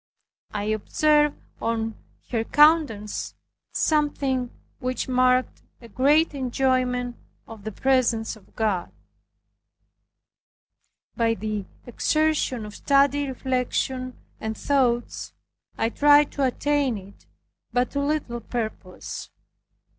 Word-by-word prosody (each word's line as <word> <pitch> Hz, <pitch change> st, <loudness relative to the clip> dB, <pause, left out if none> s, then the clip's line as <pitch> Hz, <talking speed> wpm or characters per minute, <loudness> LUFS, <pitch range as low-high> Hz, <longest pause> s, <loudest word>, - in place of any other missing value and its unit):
I 205 Hz, -1 st, -3 dB
observed 295 Hz, +8 st, +2 dB, 0.3 s
on 225 Hz, -1 st, -1 dB, 0.4 s
her 230 Hz, -2 st, +1 dB
countenance 295 Hz, -8 st, +3 dB, 0.4 s
something 275 Hz, -5 st, +1 dB, 0.3 s
which 255 Hz, 0 st, -2 dB
marked 255 Hz, 0 st, +2 dB, 0.2 s
a 235 Hz, -, -13 dB
great 290 Hz, +8 st, +3 dB
enjoyment 255 Hz, -2 st, 0 dB, 0.3 s
of 220 Hz, -3 st, -11 dB
the 220 Hz, -, -3 dB
presence 240 Hz, -1 st, +1 dB
of 215 Hz, -, -21 dB
God. 210 Hz, -6 st, -1 dB, 2.2 s
By 230 Hz, -2 st, +2 dB
the 210 Hz, -1 st, -3 dB, 0.2 s
exertion 300 Hz, -2 st, 0 dB
of 210 Hz, -, -9 dB
studied 280 Hz, 0 st, +3 dB
reflection 255 Hz, 0 st, -2 dB, 0.2 s
and 220 Hz, 0 st, -4 dB
thoughts 250 Hz, -4 st, 0 dB, 0.4 s
I 225 Hz, -, +1 dB
tried 290 Hz, +3 st, +5 dB
to 280 Hz, -, 0 dB
attain 275 Hz, -1 st, +1 dB
it 195 Hz, +1 st, -14 dB, 0.4 s
but 245 Hz, 0 st, +1 dB
to 280 Hz, -, -2 dB
little 280 Hz, -4 st, -1 dB
purpose. 220 Hz, -5 st, -5 dB
255 Hz, 100 wpm, -25 LUFS, 225-280 Hz, 2.2 s, tried